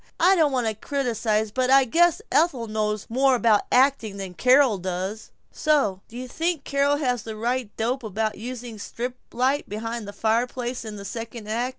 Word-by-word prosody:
I 370 +3 +5
don't 315 -5 +3
want 250 -3 0
to 220 - 0
criticize 220 -3 -1
but 255 +2 0
I 270 0 +6
guess 340 +6 +3
Ethel 290 -7 +2
knows 215 -1 -2
more 265 +3 +3
about 225 -4 +3
acting 250 -6 +3
than 190 -2 -6
Carol 250 0 +4
does!" 185 +4 -4 0.2
"Say, 285 - +1
do 235 - -11
you 255 +1 -5
think 325 +2 -2
Carol 280 +1 +1
has 250 -5 0
the 220 +1 -7
right 240 +1 -1
dope 245 +4 -1
about 220 0 -2
using 240 0 -7
a - - -13
strip 245 +4 -5 0.2
light 265 +4 0
behind 225 +1 -4
the - - -6
fireplace 240 +4 -1
in 215 -1 -6
the 200 -1 -8
second 230 +1 -7
act? 235 +4 -1
235 Hz, 190 wpm, -24 LUFS, 215-265 Hz, 0.2 s, I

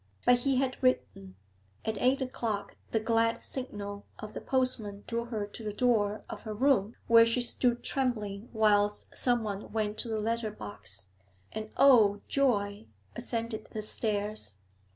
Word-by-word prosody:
But 245 0 +6
he 270 +2 +1
had 255 0 0
written; 100 - 0 0.5
at 220 -2 -2
eight 265 +2 +3
o'clock 230 -5 -3 0.2
the 225 - +2
glad 230 +1 +1
signal 205 -6 -5
of 215 0 -8
the - - -5
postman 225 -6 -1
drew 235 0 -2
her 220 -4 -3
to 205 +2 -10
the 210 -1 -3
door 215 -3 +1
of - - -7
her 215 -1 -5
room 235 -3 +2
where 230 0 +8
she 230 +2 +1
stood 240 0 0
trembling 220 -5 -2
whilst 210 -2 +2
someone 220 -5 0
went 215 -1 -1
to - - -1
the 220 -1 -1
letter 225 +1 -1
box, 100 - -4 0.4
and 215 0 -5
oh, 220 -7 +6
joy! 210 -6 +1 0.3
ascended 230 -2 -3
the 215 - -3
stairs. 210 - 0
220 Hz, 150 wpm, -30 LUFS, 205-245 Hz, 0.5 s, where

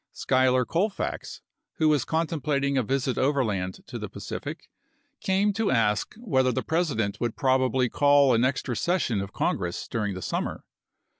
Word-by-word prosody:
Schuyler 130 -1 +2
Colfax, 195 - -2 0.3
who 160 - +1
was 150 -4 +3
contemplating 150 -4 0
a 130 - +3
visit 130 +2 -1
overland 110 -10 0
to - - -7
the - - -5
Pacific, - - -7 0.5
came 195 +2 +1
to 210 +1 0
ask 105 - +1
whether 130 - +1
the - - -2
President 145 - -1
would 120 -2 -1
probably 130 -1 +2
call 140 0 +4
an 115 +1 +3
extra 130 -1 0
session 170 - 0
of 100 - -6
Congress 85 0 -2
during 105 -4 -2
the 95 - -6
summer. - - -3
130 Hz, 150 wpm, -26 LUFS, 115-155 Hz, 0.5 s, call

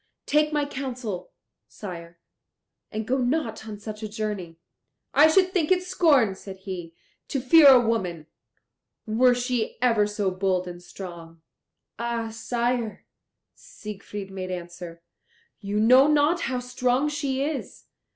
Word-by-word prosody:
Take 300 +1 +2
my 295 -1 +1
counsel, 250 -9 -5 0.4
sire, 170 -4 -9 0.7
and 215 0 -3
go 265 +2 +1
not 245 -4 -1
on 210 -1 -6
such 215 +1 -8
a 215 - -4
journey." 205 -6 -4 0.6
"I 300 +2 +7
should 370 +3 +3
think 350 -3 +1
it 365 -1 +3
scorn," 290 - +3
said 190 0 -10
he, 185 -4 -7 0.3
"to 275 - -2
fear 290 +4 +7
a 265 -2 +9
woman, 190 -9 -1 0.8
were 245 +3 +4
she 245 -2 -2
ever 230 -4 +3
so 205 -2 -1
bold 185 -1 0
and 175 0 -8
strong." 170 -3 -10 0.6
"Ah, 235 -1 -2
sire," 235 0 -2 0.5
Siegfried 205 -1 -9
made 185 -1 -5
answer, 175 -1 -7 0.6
"you 205 0 -2
know 255 +5 +6
not 300 +3 +3
how 255 - -1
strong 250 +2 0
she 275 -2 -1
is. 295 0 -5
225 Hz, 135 wpm, -25 LUFS, 190-265 Hz, 0.8 s, a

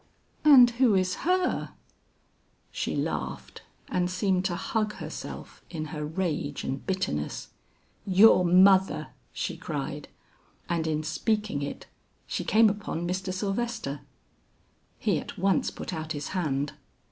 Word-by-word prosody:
"And 275 -5 +9
who 235 -6 +5
is 185 -1 +2 0.2
her?" 365 0 +1 1.0
She - - -2
laughed - - -4 0.3
and 180 0 0
seemed 185 0 0
to 175 - 0
hug 215 +3 -1
herself - - -8
in 155 -3 -4
her 150 -1 -4
rage 155 -2 -2
and 135 +1 -3
bitterness. 185 - -2 0.5
"Your 195 0 +6
mother!" 190 +2 +5 0.2
she - - -3
cried, - - -5 0.6
and 170 -2 -1
in 155 -1 -1
speaking 210 +1 -1
it, 140 - -5 0.4
she - - -3
came 220 +1 +5
upon 195 -5 -2
Mr. 185 +1 -2
Sylvester. 195 - -3 1.0
He - - +1
at - - -9
once 195 +1 +2
put - - -7
out 160 -1 -4
his 145 -1 -5
hand. 145 -6 -1
185 Hz, 125 wpm, -27 LUFS, 155-205 Hz, 1.0 s, And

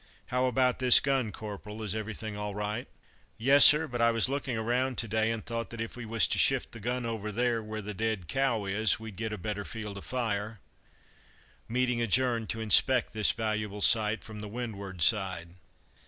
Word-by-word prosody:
"How 125 0 +1
about 125 0 +1
this 125 -2 +7
gun, 135 -5 -1
Corporal 105 +1 -8
is 100 -3 -1
everything 110 0 -5
all 105 -1 -5
right?" 105 +4 -4 0.5
"Yes, 135 +5 +5
sir; 150 +2 +7
but 120 -3 -4
I 115 - +4
was 115 0 +1
looking 135 -3 -3
around 125 +3 -1
to 115 - -1
day, 110 +1 0
and 115 -1 -4
thought 115 0 -4
that 115 - -9
if 115 0 -5
we 120 -2 -8
was 115 -1 +3
to - - +2
shift - - +3
the 115 - -9
gun 120 +3 -3
over 110 -2 -4
there, 120 +1 -1
where 110 0 -7
the 105 +1 -5
dead 110 -3 -3
cow 135 -6 -1
is, 100 +2 +1
we'd 110 -2 -9
get 110 +2 -4
a 105 - -5
better 105 +2 -5
field 105 -2 -7
of - - -13
fire." 110 -3 -3 1.1
Meeting 125 0 0
adjourned 115 0 +2
to 110 - -3
inspect 120 +4 +4
this 110 -1 +3
valuable 110 -2 -3
site 110 0 +3
from 110 -1 -9
the 105 - -7
windward 100 -6 -4
side. 95 -5 +3
110 Hz, 200 wpm, -28 LUFS, 105-120 Hz, 1.1 s, this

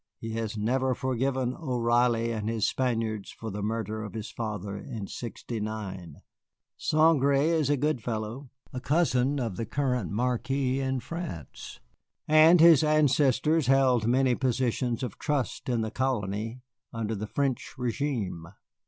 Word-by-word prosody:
He 115 +1 -6
has 110 -1 -3
never 130 +4 +1
forgiven 130 0 -1
O'Reilly 120 -4 +1
and 110 -1 -2
his 115 -2 0
Spaniards 115 -5 -1
for 110 -1 -7
the 105 +2 -5
murder 110 0 -2
of 110 0 -7
his 110 -1 -5
father 105 -3 -4
in 110 0 -6
sixty 115 +1 -6
nine. 95 -7 -6 0.5
Saint 155 -2 +3
Gré 140 +1 +3
is 160 -4 +1
a 145 - +3
good 145 -2 0
fellow, 115 +4 -4 0.2
a 125 - -4
cousin 140 -3 +1
of 115 -7 -3
the 115 - -2
present 125 -7 -1
Marquis 125 +4 0
in 130 -1 -1
France, 165 - -7 0.5
and 155 +3 +7
his 160 -3 +7
ancestors 150 0 +3
held 130 -4 +3
many 130 +1 +3
positions 125 -1 0
of 120 -6 -5
trust 145 -4 -2
in 120 -2 +1
the 110 -1 -3
colony 115 -2 -2 0.3
under 115 -1 -3
the 105 0 -4
French 135 +1 -2
régime. 115 - -3
125 Hz, 145 wpm, -28 LUFS, 110-135 Hz, 0.5 s, and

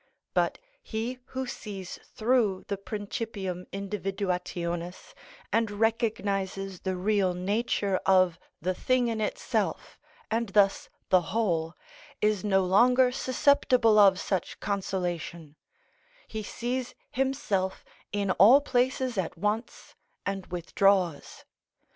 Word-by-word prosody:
But - - +1 0.2
he 240 - -4
who 260 0 -4
sees 200 -6 -7
through 220 -5 +1
the 200 - 0
principium 200 -3 -5
individuationis, 185 - -3 0.4
and 225 -1 +2
recognises 200 -3 -1
the 190 -1 -2
real 190 -1 +1
nature 200 +1 0
of 185 -3 +4 0.2
the 185 +3 -1
thing 250 +4 +1
in 225 -1 -2
itself, 210 - -2 0.3
and 225 -1 0
thus 195 0 +3 0.2
the 185 -1 +5
whole, 170 -6 -1 0.4
is 210 -2 +1
no 195 -2 +2
longer 250 +7 +5
susceptible 255 -4 +3
of 195 -2 +6
such 190 -3 -2
consolation; 175 -5 -3 0.7
he 220 - -5
sees 245 +4 -4 0.2
himself 255 -8 -1 0.3
in 200 -1 0
all 225 +9 +7
places 255 -4 0
at 175 -1 -3
once, 210 +5 -3 0.3
and 195 -2 -3
withdraws. 180 -1 0
200 Hz, 105 wpm, -28 LUFS, 185-230 Hz, 0.7 s, all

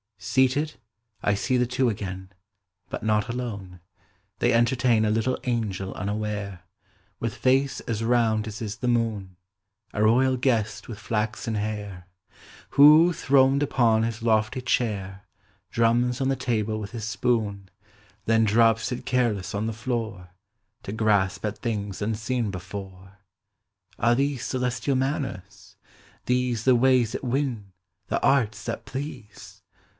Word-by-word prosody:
Seated 130 +10 +1 0.5
I 100 - +3
see 125 +6 0
the 125 - +2
two 125 +1 +1
again, 95 -3 -5 0.6
But - - -5
not 110 +1 +1
alone; 105 -7 -5 0.6
the.v 120 - +2
entertain 120 -1 +3
A 110 - +2
little 115 +4 0
angej 105 -6 -2
unaware, 100 -1 -3 0.6
With 115 -2 -3
face 135 +2 +1
as 115 -1 -3
round 115 -2 +2
as 110 +1 -7
is 110 -1 -4
the 125 - -3
moon; 110 -6 -1 0.6
A 105 - 0
royal 130 +4 +4
guest 110 -5 0
with 110 -3 -8
flaxen 110 +1 -2
hair. 105 -4 -4 0.6
Who, 155 +5 +7
throned 135 -1 +3
upon 115 -5 +3
his 115 -1 -3
lofty 110 +2 +1
chair, 100 -6 -1 0.5
Drums 120 +2 +2
on 135 - +1
the 135 - +1
table 110 -4 -1
with 100 -1 -6
his 115 -3 -5
spoon, 105 -4 -1 0.6
Then 115 0 +3
drops 115 +2 +3
it 125 - -5
careless 120 -7 0
on 105 +2 -1
the 115 - -2
floor,. 110 -6 -4 0.5
To - - -6
grasp 100 -2 +1
at 105 - -3
things 105 -4 -3
unseen 115 +2 -1
before. 95 +1 -9 0.8
Are 120 - +3
these 140 0 -1
celestial 125 +1 -1
manners? 105 - -4 0.5
these 125 -2 0
The 130 -1 +5
ways 125 -2 +3
that - - -4
win. 125 -6 -2 0.4
the - - -1
arts 130 -6 +2
that - - -4
please? 130 -6 -8
115 Hz, 135 wpm, -25 LUFS, 105-125 Hz, 0.8 s, Who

